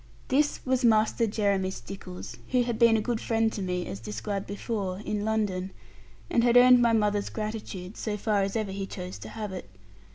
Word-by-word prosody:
This 290 Hz, +2 st, +2 dB
was 260 Hz, 0 st, +1 dB
Master 225 Hz, 0 st, +3 dB
Jeremy 200 Hz, -3 st, +1 dB
Stickles, 180 Hz, +4 st, -8 dB
who 250 Hz, -1 st, +3 dB
had 235 Hz, -2 st, -3 dB
been 230 Hz, -1 st, +6 dB
a -, -, 0 dB
good 230 Hz, +1 st, -2 dB
friend 225 Hz, -1 st, +1 dB
to 205 Hz, -, -4 dB
me 180 Hz, -1 st, -2 dB
(as 100 Hz, -, -6 dB
described 115 Hz, -, -4 dB
before) 200 Hz, -2 st, -3 dB
in 210 Hz, -1 st, -2 dB
London, 205 Hz, -4 st, -1 dB, 0.6 s
and 235 Hz, -, +2 dB
had 240 Hz, 0 st, +5 dB
earned 250 Hz, 0 st, +8 dB
my 235 Hz, -1 st, +4 dB
mother's 210 Hz, -2 st, +1 dB
gratitude, 215 Hz, -3 st, -5 dB
so 210 Hz, -2 st, -3 dB
far 210 Hz, -1 st, +1 dB
as 195 Hz, +2 st, -1 dB
ever 215 Hz, -3 st, -1 dB
he 195 Hz, 0 st, -4 dB
chose 180 Hz, -1 st, -7 dB
to -, -, -8 dB
have 210 Hz, -3 st, -5 dB
it. 180 Hz, -, -7 dB
210 Hz, 195 wpm, -28 LUFS, 190-230 Hz, 0.6 s, earned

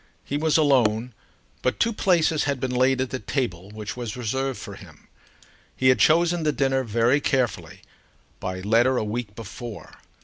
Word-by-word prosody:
He 140 Hz, -, -4 dB
was 155 Hz, +1 st, +2 dB
alone, 125 Hz, -6 st, +2 dB, 0.5 s
but 130 Hz, -, -1 dB
two 230 Hz, 0 st, +2 dB
places 170 Hz, -6 st, +2 dB
had 140 Hz, -2 st, -1 dB
been 130 Hz, 0 st, -2 dB
laid 130 Hz, +1 st, +2 dB
at 130 Hz, -, -3 dB
the 130 Hz, -, -3 dB
table 100 Hz, -11 st, -3 dB
which 105 Hz, 0 st, -7 dB
was 120 Hz, -2 st, -5 dB
reserved 130 Hz, +3 st, -2 dB
for -, -, -8 dB
him. -, -, -15 dB, 0.7 s
He 130 Hz, -, +3 dB
had 130 Hz, -3 st, +4 dB
chosen 170 Hz, +4 st, +4 dB
the 155 Hz, -1 st, +1 dB
dinner 135 Hz, -2 st, +1 dB
very 120 Hz, +5 st, +2 dB
carefully, 125 Hz, -8 st, -1 dB, 0.6 s
by 95 Hz, 0 st, -4 dB
letter 115 Hz, +6 st, +3 dB
a -, -, 0 dB
week 105 Hz, -1 st, -4 dB
before. 115 Hz, +1 st, -8 dB
130 Hz, 170 wpm, -24 LUFS, 115-140 Hz, 0.7 s, had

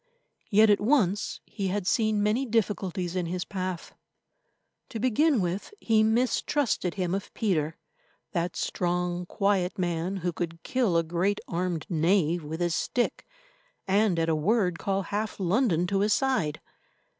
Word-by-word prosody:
Yet 215 Hz, 0 st, +6 dB
at 205 Hz, -, +3 dB
once 210 Hz, -5 st, +1 dB
he 200 Hz, -3 st, -4 dB
had 195 Hz, 0 st, -2 dB
seen 215 Hz, 0 st, +2 dB
many 215 Hz, +6 st, +2 dB
difficulties 195 Hz, -6 st, -1 dB
in 180 Hz, -2 st, -1 dB
his 180 Hz, +1 st, -3 dB
path. 185 Hz, -3 st, -5 dB, 1.0 s
To 225 Hz, -, -5 dB
begin 255 Hz, +2 st, +3 dB
with, 185 Hz, -, -3 dB
he 220 Hz, -1 st, +3 dB
mistrusted 230 Hz, -, +1 dB
him 180 Hz, -3 st, -1 dB
of 195 Hz, +1 st, -3 dB
Peter, 165 Hz, -8 st, 0 dB, 0.5 s
that 175 Hz, -2 st, -2 dB
strong, 180 Hz, 0 st, -1 dB
quiet 195 Hz, -3 st, 0 dB
man 175 Hz, +1 st, -1 dB
who 175 Hz, -, 0 dB
could 165 Hz, 0 st, -5 dB
kill 235 Hz, -10 st, +1 dB
a 165 Hz, -, +3 dB
great 175 Hz, +5 st, 0 dB
armed 175 Hz, -2 st, -2 dB
knave 170 Hz, 0 st, +2 dB
with 160 Hz, +3 st, -5 dB
his 175 Hz, -1 st, +1 dB
stick, 245 Hz, +8 st, -1 dB, 0.6 s
and 200 Hz, -1 st, +3 dB
at 165 Hz, 0 st, +1 dB
a 165 Hz, -, +2 dB
word 180 Hz, +2 st, +1 dB
call 195 Hz, 0 st, -1 dB
half 205 Hz, +4 st, -3 dB
London 185 Hz, -2 st, +2 dB
to 195 Hz, +2 st, 0 dB
his 205 Hz, +1 st, +3 dB
side. 260 Hz, -, 0 dB
190 Hz, 150 wpm, -27 LUFS, 175-215 Hz, 1.0 s, Yet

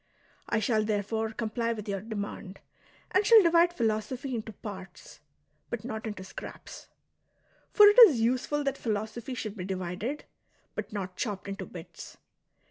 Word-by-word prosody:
I -, -, +1 dB
shall 220 Hz, 0 st, +1 dB
therefore 215 Hz, +1 st, -1 dB
comply 230 Hz, +1 st, -2 dB
with 215 Hz, -1 st, -7 dB
your 195 Hz, -2 st, -2 dB
demand, 205 Hz, -3 st, -6 dB, 0.5 s
and 380 Hz, +2 st, +3 dB
shall 440 Hz, 0 st, +8 dB
divide 340 Hz, 0 st, +5 dB
philosophy 240 Hz, 0 st, -2 dB
into 225 Hz, -1 st, -4 dB
parts, 195 Hz, -2 st, -10 dB, 0.5 s
but 235 Hz, -2 st, -5 dB
not 220 Hz, -2 st, -4 dB
into 205 Hz, -3 st, -6 dB
scraps. 190 Hz, -, -10 dB, 0.8 s
For 420 Hz, -, +8 dB
it 415 Hz, +4 st, +7 dB
is 280 Hz, -, -1 dB
useful 255 Hz, +5 st, 0 dB
that 275 Hz, -1 st, -2 dB
philosophy 220 Hz, +3 st, -3 dB
should 215 Hz, -4 st, -5 dB
be 185 Hz, -, -5 dB
divided, 190 Hz, +8 st, -4 dB, 0.5 s
but 215 Hz, -1 st, -5 dB
not 190 Hz, -3 st, -5 dB
chopped 205 Hz, -4 st, -3 dB
into 195 Hz, -1 st, -5 dB
bits. 175 Hz, -1 st, -11 dB
220 Hz, 145 wpm, -29 LUFS, 200-250 Hz, 0.8 s, shall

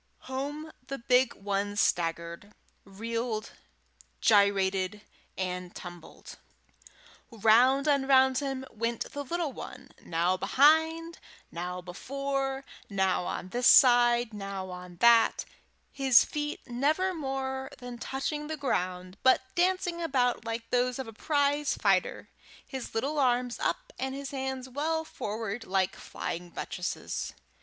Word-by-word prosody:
Home 290 Hz, +4 st, -5 dB, 0.2 s
the 275 Hz, -, -4 dB
big 250 Hz, +1 st, +2 dB
one 200 Hz, 0 st, -2 dB
staggered, 170 Hz, 0 st, -1 dB, 0.3 s
reeled, 225 Hz, +2 st, -4 dB, 0.7 s
gyrated, 200 Hz, -1 st, +3 dB, 0.4 s
and 180 Hz, -1 st, -4 dB
tumbled; 175 Hz, -2 st, -10 dB, 0.9 s
round 240 Hz, +6 st, +4 dB
and 280 Hz, -2 st, +2 dB
round 265 Hz, -1 st, +5 dB
him 270 Hz, -2 st, -3 dB
went 230 Hz, +1 st, -3 dB
the 285 Hz, -, -4 dB
little 330 Hz, 0 st, -2 dB
one, -, -, -9 dB
now 175 Hz, +3 st, +1 dB
behind, 320 Hz, -, +3 dB, 0.3 s
now 180 Hz, +1 st, -4 dB
before, 270 Hz, +8 st, -3 dB, 0.2 s
now 190 Hz, -3 st, +1 dB
on 185 Hz, -, -4 dB
this 245 Hz, +4 st, +1 dB
side, 240 Hz, -2 st, +6 dB
now 195 Hz, -2 st, -5 dB
on 180 Hz, 0 st, -9 dB
that, 235 Hz, -1 st, +5 dB, 0.5 s
his 265 Hz, -3 st, +5 dB
feet 295 Hz, 0 st, -4 dB
never 300 Hz, +10 st, +1 dB
more 265 Hz, -3 st, -3 dB
than 245 Hz, -2 st, -8 dB
touching 295 Hz, +4 st, -3 dB
the 315 Hz, 0 st, -4 dB
ground 185 Hz, -8 st, -2 dB
but 260 Hz, 0 st, +5 dB
dancing 355 Hz, -1 st, +1 dB
about 255 Hz, -8 st, +1 dB
like 230 Hz, 0 st, -4 dB
those 250 Hz, 0 st, +1 dB
of 265 Hz, -, -5 dB
a 225 Hz, -, -9 dB
prize 290 Hz, +3 st, +1 dB
fighter, -, -, +1 dB, 0.4 s
his 265 Hz, -4 st, -7 dB
little 280 Hz, +7 st, 0 dB
arms 245 Hz, -2 st, +1 dB
up -, -, -2 dB
and 265 Hz, 0 st, -2 dB
his 280 Hz, 0 st, -6 dB
hands 265 Hz, -1 st, -4 dB
well 315 Hz, +5 st, -1 dB
forward, 220 Hz, -3 st, -4 dB
like 190 Hz, -2 st, 0 dB
flying 175 Hz, +1 st, -6 dB
buttresses. 180 Hz, +1 st, -4 dB
245 Hz, 125 wpm, -29 LUFS, 200-275 Hz, 0.9 s, side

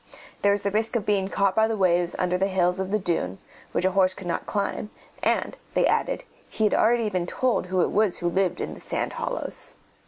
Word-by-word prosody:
There 200 Hz, -, +4 dB
was 200 Hz, 0 st, 0 dB
risk 215 Hz, +4 st, 0 dB
of 220 Hz, -4 st, 0 dB
being 200 Hz, -2 st, +1 dB
caught 195 Hz, 0 st, +1 dB
by 220 Hz, 0 st, +4 dB
the 225 Hz, -1 st, -1 dB
waves 175 Hz, -2 st, +2 dB
under 180 Hz, 0 st, +1 dB
the 190 Hz, +2 st, +2 dB
hills 180 Hz, -1 st, +1 dB
of 190 Hz, 0 st, -2 dB
the 210 Hz, -, +2 dB
dune, 165 Hz, -, -1 dB, 0.3 s
which 180 Hz, -, 0 dB
a 190 Hz, -, +3 dB
horse 185 Hz, 0 st, +3 dB
could 195 Hz, -, -9 dB
not 170 Hz, -, -2 dB
climb, 210 Hz, 0 st, -2 dB, 0.3 s
and, -, -, +1 dB, 0.2 s
they -, -, +4 dB
added, -, -, +1 dB, 0.3 s
he 220 Hz, -, -2 dB
had 210 Hz, -, +3 dB
already 230 Hz, 0 st, +3 dB
been 180 Hz, -2 st, -1 dB
told 250 Hz, -5 st, 0 dB
who 185 Hz, 0 st, +1 dB
it -, -, +1 dB
was 210 Hz, -3 st, +2 dB
who 175 Hz, -, -2 dB
lived 185 Hz, +1 st, +1 dB
in -, -, -3 dB
the -, -, -11 dB
sand -, -, -2 dB
hollows. -, -, -4 dB
190 Hz, 225 wpm, -25 LUFS, 180-210 Hz, 0.3 s, There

